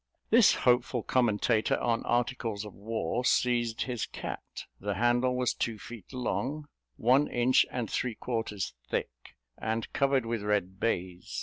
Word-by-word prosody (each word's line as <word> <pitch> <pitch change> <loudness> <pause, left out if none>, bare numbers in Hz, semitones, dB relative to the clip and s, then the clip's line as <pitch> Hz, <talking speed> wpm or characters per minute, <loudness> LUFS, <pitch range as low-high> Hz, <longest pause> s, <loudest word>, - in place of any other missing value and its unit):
This 230 -2 +7
hopeful 125 -1 +2
commentator 115 -2 +2
on 115 -1 +1
articles 120 -3 -1
of 105 - -9
war, 110 +2 -2
seized 120 -2 +2
his 125 -4 -3
cat: - - -7 0.2
the 100 0 -2
handle 120 +4 +2
was 125 -1 +1
two 115 -2 -2
feet 115 -2 -10
long, 140 +3 -2 0.3
one 130 +5 +4
inch 120 +1 +3
and 120 -3 -3
three 120 +2 -2
quarters 110 -5 -3 0.2
thick, - - -1 0.5
and 110 +1 -2
covered 135 -3 +2
with 115 -1 -2
red 100 -2 -1
baize. 90 -5 -2
120 Hz, 140 wpm, -30 LUFS, 105-125 Hz, 0.5 s, This